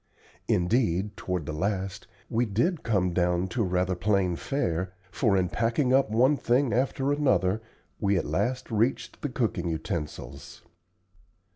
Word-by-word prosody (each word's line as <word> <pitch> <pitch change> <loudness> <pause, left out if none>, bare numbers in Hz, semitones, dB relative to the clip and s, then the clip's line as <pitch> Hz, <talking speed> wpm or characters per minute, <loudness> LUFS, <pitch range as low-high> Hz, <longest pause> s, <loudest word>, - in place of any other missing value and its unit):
Indeed, 95 0 +1
toward 90 -4 -3
the 75 - -4
last, 95 +3 -2 0.2
we 120 +1 0
did 145 - 0
come 95 -6 +1
down 90 +1 +1
to 120 - -1
rather 90 -1 +1
plain 95 -1 +1
fare, 90 - -2 0.2
for 105 -3 +2
in 90 -1 +2
packing 120 - +1
up 135 -3 +4
one 130 +7 +3
thing 125 +1 +2
after 135 +3 +1
another 120 -9 +2 0.4
we 100 -2 +2
at - - -1
last 125 +6 -1
reached 115 +4 0
the 145 - -2
cooking 105 -9 -1
utensils. 80 -1 -5
100 Hz, 140 wpm, -27 LUFS, 90-125 Hz, 0.4 s, up